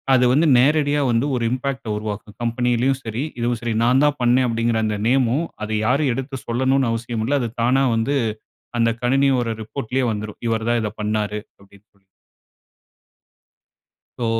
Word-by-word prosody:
அது 125 0 +4
வந்து 155 +3 +3
நேரடியா 145 +1 +3
வந்து 115 +3 +1
ஒரு 120 - -2
இம்பாக்ட்ட 130 -2 -3
உருவாக்கும். 105 0 -6
கம்பெணியிலும் 125 +3 +1
சரி, 115 +5 -3 0.2
இதுவும் 120 -1 -1
சரி 115 -2 -1
நான் 130 +3 +4
தான் 145 -1 +1
பண்ணேண் 125 +1 +3
அப்டின்கிற 115 0 0
அந்த 105 -1 -2
நேமும் 130 +4 +2 0.2
அத 110 - -4 0.2
யாரும் 135 +1 +2
எடுத்து 135 +1 -5
சொல்லணும்ன்னு 130 +1 +1
அவசியம் 115 -1 -3
இல்ல. 145 - +2
அது 120 - -2
தானா 130 +3 +3
வந்து 125 +6 0 0.6
அந்த 115 -1 +3
கணினியோட 130 -1 +2
ரிப்போர்ட்லயே 130 +3 -3
வந்துரும். 105 0 -6
இவர் 115 0 -1
தான் 120 - +2
இதை 105 - -2
பண்ணார் 105 0 -1 0.2
அப்டின்னு 100 +1 -20
வரும். 95 -1 -34 2.1
சோ 120 - 0
120 Hz, 155 wpm, -21 LUFS, 110-135 Hz, 2.1 s, அது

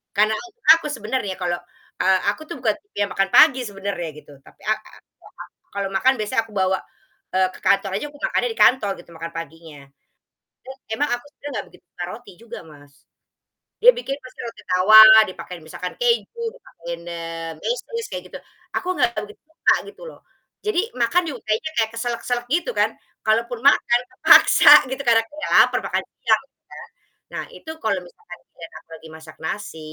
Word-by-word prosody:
Karena 215 +2 +3
u 360 - -8 0.3
aku 330 - -6
sebenernya 215 -3 -3
kalo, 175 -1 0 0.5
eee, 190 0 +3
aku 210 - -3
tuh 340 - -6
bukan 220 -4 0
tipe 410 - -22
yang 200 -2 -1
makan 195 0 0
pagi 290 -4 +7
sebenernya 195 -3 -5
gitu 150 - -15
tapi - - -20
a - - +5
a 215 - -17 0.6
aku - - -48
kalo 200 -1 -2
makan 260 +7 +4
biasanya 215 +1 0
aku 225 - -18
bawa, 190 0 +1 0.6
eee, 185 0 +3
ke - - -14
kantor 195 0 +3
aja 205 - -4
aku 290 - -16
makannya - - 0
di - - -15
kantor 240 -5 +4
gitu 175 - -18
makan 165 +1 -7
paginya. 165 -1 -9 0.9
Eee, 265 0 -9 0.2
emang 290 +3 0
aku 245 - -7
sebenernya 290 - -9
gak - - -11
begitu - - -21
suka 175 - -6
roti 240 +3 -11
juga, 235 0 -9
Mas, 145 -1 -17 0.9
dia - - +10
bikin 275 - -4
pasti 255 - -14
roti 230 - -10
tawar, 215 +4 +9
dipakein 180 -2 -9
misalkan 180 +3 -7
keju, 470 -1 0
dipakein, 170 - -9
eee, 165 -1 -6
mesis 465 -1 -3
kayak - - -5
gitu. - - -9 0.4
Aku 365 - -3
gak - - +3
begitu 210 0 -12
suka 320 - +2
gitu 410 - -14
loh, - - -17 0.5
jadi 420 -4 +2 0.2
makan 240 +10 +2
juga 260 -5 -8
kayaknya 220 +9 -1
kayak 220 -1 +1
keselek-keselek 240 +1 -3
gitu 350 - 0
kan - - +2 0.4
kalaupun 235 +2 +1
makan, 260 -3 +4
terpaksa 375 - +6 0.2
gitu, 265 - -4
karena 230 -1 +5 0.2
ya - - -2
lapar, - - +1
makan - - -1 0.2
siang - - +2
gitu - - -65
ya. - - -10 0.5
Nah - - -3
itu 320 - -11
kalau 200 -3 0
misalkan 435 - -14
giliran - - -12
aku - - -55
lagi 160 - -14
masak 160 0 -14
nasi 195 -1 -5
220 Hz, 185 wpm, -21 LUFS, 185-265 Hz, 0.9 s, dia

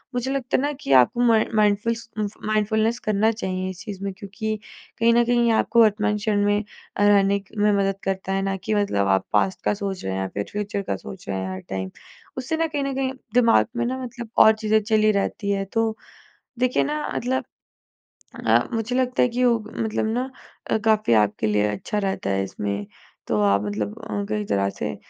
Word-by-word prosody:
मुझे 250 +2 -1
लगता 270 -2 -1
है - - 0
ना 290 +1 0
कि 140 - -4
आप 125 -2 +6
म 240 -1 +4 0.2
माइंडफुलस 215 +2 +1
उम, 210 - +1 0.2
माइंडफुलनेस 220 +2 +1
करना 215 +1 +2
चाहिए 185 -3 -3
इस 185 - -8
चीज़ 200 -1 -7
में। 195 - -2
क्योंकि 210 +2 -4 0.4
कहीं 230 0 +4
न 240 0 +5
कहीं 240 -1 +3
आपको 235 +1 +3
वर्तमान 210 -1 +3
क्षण 205 -1 0
में 205 +1 +2 0.3
अ, 205 - +2
रहने 200 -1 +4
क - - -17
में 210 0 +3
मदद 195 0 0
करता 190 0 -2
है, 195 - 0
ना 195 0 -1
कि 215 +4 -3
मतलब 150 - +1
आप 95 -1 +2
पास्ट 190 - +1
का - - +3
सोच 200 -2 -4
रहे 95 - -2
हैं 95 - -2
या 95 - -1
फिर 100 - -2
फ्यूचर 205 0 -3
का - - -2
सोच 190 -2 -10
रहे 95 - -1
हैं, 95 0 -4
हर 95 - -5
टाइम। 95 -1 -3 0.5
उससे 260 +5 -2
ना 325 0 +1
कहीं 290 -2 -2
न 275 0 -2
कहीं 265 -1 0 0.2
दिमाग़ 235 -2 +5
में 240 - +1
ना 255 +2 -2
मतलब 240 -2 -7
और 220 - +8
चीज़ें 215 0 +2
चली 215 0 +3
रहती 200 0 -1
है, 195 -1 0
तो 225 +2 -1 0.6
देखिए 255 0 +2
ना, 300 +1 -2
मतलब 260 +2 -1 1.0
अ, - - +5
मुझे 230 +2 -1
लगता 255 -1 +1
है 250 - +4
कि 245 +1 -2
योग 230 -3 +2
मतलब 220 -1 -1
ना 255 +3 -2 0.4
अ, - - +3
काफ़ी 215 - +3
आपके 105 +1 -1
लिए 105 0 +2
अच्छा 105 - -3
रहता 190 - -2
है 95 0 +1
इसमें, 100 +1 -4 0.4
तो 105 - 0
आप 100 -1 +3
मतलब 105 0 -3
अ, 100 -1 -3
कई 105 -1 -1
तरह 100 -1 0
से 75 - -2
210 Hz, 215 wpm, -23 LUFS, 185-230 Hz, 1.0 s, और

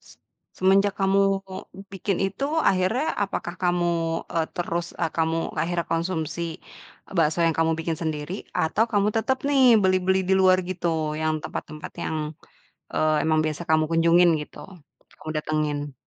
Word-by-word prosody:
Se - - -19 0.4
semenjak 195 +1 +4
kamu 195 0 +3 0.7
bikin 195 -1 -2
itu, 195 +8 -1 0.2
akhirnya, 190 +8 +1 0.2
apakah 185 -3 -3
kamu, 175 -1 +2 0.4
eee, 165 -1 0
terus 170 -1 -2 0.3
kamu 160 0 +1 0.2
akhirnya 170 +1 -1
konsumsi, 165 -1 -2 0.7
bakso 160 -1 +2
yang 165 - +1
kamu 165 0 +3
bikin 165 0 -2
sendiri, 155 0 -3 0.2
atau 185 +7 +1
kamu 205 0 +3
tetep 260 +4 +1
nih 280 -2 +3 0.2
beli-beli 185 0 +2
di 190 - +4
luar 185 0 +5
gitu, 175 -2 -2 0.3
yang 155 0 +1
tempat-tempat 155 0 -7
yang, 160 - -2 0.8
eee, 155 0 +2
emang 155 0 +2
biasa 155 +2 -3
kamu 155 0 +4
kunjungin 170 +1 +5
gitu, 150 - -11 0.6
kamu 155 - -10
datengin? 150 -2 -2
170 Hz, 140 wpm, -24 LUFS, 160-190 Hz, 0.8 s, luar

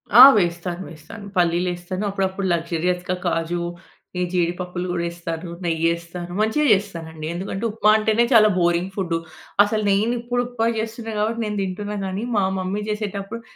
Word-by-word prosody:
ఆ! 240 - +11 0.2
వేస్తాను, 175 0 -2
వేస్తాను. 165 +7 -11
పల్లీలేస్తాను. 175 +2 0
అప్పుడప్పుడు 195 0 -1
లక్సూరియస్‌గా 175 +2 -1
కాజు. 170 0 0 0.6
ఈ - - 0
జీడిపప్పులు 180 0 -1
గూడా 175 -1 -1
ఎస్తాను, 170 0 -5
నెయ్యేస్తాను, 170 +1 -1
మంచిగా 220 +8 +2
చేస్తానండి. 165 -6 -3
ఎందుకంటే 190 +4 -4
ఉప్మా 210 0 +2
అంటేనే 220 +1 +2
చాలా 215 -2 +7
బోరింగ్ 175 +1 +1
ఫుడ్డు. 175 -4 -1 0.5
అసలు 215 +1 -1
నేను 210 +4 +2
ఇప్పుడు 245 +1 -1
ఉప్మా 235 -2 -1
చేస్తున్నా 225 +1 -4
గాబట్టి 225 +2 0
నేను 210 -1 -3
తింటున్నా 205 +2 -4
గానీ. 190 +3 -3
మా 200 - +3 0.2
మమ్మీ 190 +3 -2
చేసేటప్పుడు 210 +1 -4
185 Hz, 140 wpm, -22 LUFS, 175-210 Hz, 0.6 s, ఆ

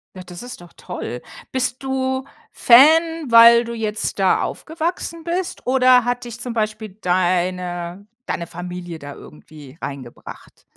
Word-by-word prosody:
Ja, 185 - -8
das 180 +4 -10
ist 245 -7 -9
doch 175 - -15
toll. 125 -9 -6 0.3
Bist 255 0 -2
du 265 0 -2 0.3
Fan, 315 +3 +5
weil 235 +1 +8
du 235 0 -6
jetzt 215 -2 -3
da 190 -1 +3
aufgewachsen 330 +1 -4
bist, 350 +2 -4
oder 255 -1 +4
hat 245 0 -2
dich 240 0 -8
zum 245 -2 -5
Beispiel 215 -1 -3
deine 180 0 -1 0.2
deine 170 - -3
Familie 175 -1 -7
da 145 0 -9
irgendwie 150 -2 -14
reingebracht? 135 -4 -9
225 Hz, 140 wpm, -20 LUFS, 175-260 Hz, 0.3 s, weil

